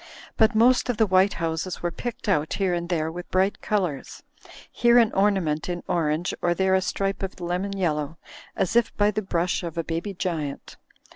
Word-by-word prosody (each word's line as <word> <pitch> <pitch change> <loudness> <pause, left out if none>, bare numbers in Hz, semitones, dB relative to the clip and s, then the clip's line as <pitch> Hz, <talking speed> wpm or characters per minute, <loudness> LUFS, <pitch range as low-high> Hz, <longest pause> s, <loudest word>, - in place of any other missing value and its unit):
But 220 -1 +3
most 245 +3 +4
of 245 - 0
the 220 - +4
white 190 0 +3
houses 165 +2 -3
were 175 - 0
picked 240 +5 -6
out 155 -6 +1
here 190 -3 0
and 170 0 -3
there 160 -3 0
with 175 +2 -8
bright 190 +2 +1
colours, 180 -10 -2 0.5
here 240 0 +4
an 230 -3 +4
ornament 190 -6 +1
in 175 -1 -3
orange 160 +1 0
or 175 0 +1
there 190 +1 +2
a 190 - +4
stripe 195 +1 -2
of 195 0 -5
lemon 180 +3 -2
yellow, 155 -4 -1 0.4
as 195 +2 -1
if 235 -1 +2
by 205 0 +3
the 215 - -2
brush 180 -2 -1
of 170 -2 -6
a 165 - 0
baby 170 +5 -4
giant. 160 -6 -4
185 Hz, 195 wpm, -25 LUFS, 165-200 Hz, 0.5 s, most